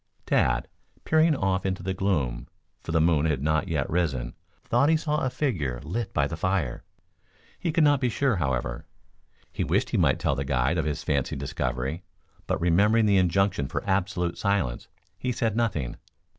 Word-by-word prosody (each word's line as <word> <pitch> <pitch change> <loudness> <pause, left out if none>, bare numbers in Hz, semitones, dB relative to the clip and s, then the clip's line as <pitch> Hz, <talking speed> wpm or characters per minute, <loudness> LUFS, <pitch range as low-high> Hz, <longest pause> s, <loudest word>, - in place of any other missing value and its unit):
Tad, - - +2 0.4
peering 160 0 +3
off 95 -5 0
into 95 -2 -2
the 95 +1 -1
gloom, 75 -12 -1 0.3
for - - -6
the 80 - +3
moon 80 -1 +3
had 70 -4 -1
not 80 +1 +1
yet 75 -4 -1
risen, 70 -8 -1 0.3
thought 145 - +2
he 160 - +4
saw 150 -1 -1
a 130 - +1
figure 85 - -2
flit 100 - -4
by 70 - +1
the 75 - -4
fire. 85 -7 -1 0.8
He 170 - -1
could 165 0 +3
not 145 -2 +4
be 125 - +2
sure, 130 -2 +1
however. 65 -6 -2 0.7
He - - -1
wished - - 0
he - - +1
might - - +3
tell - - 0
the 70 0 -2
guide 70 +4 +1
of 80 - 0
his 75 -2 -2
fancied 70 -1 -1
discovery; 65 +2 -3 0.5
but, - - 0
remembering 105 +7 +3
the 100 -2 +4
injunction 95 -5 +2
for - - -4
absolute 95 -2 0
silence, 100 - 0 0.3
he 125 - -1
said 115 -3 -1
nothing. 90 - -1
90 Hz, 180 wpm, -26 LUFS, 70-105 Hz, 0.8 s, he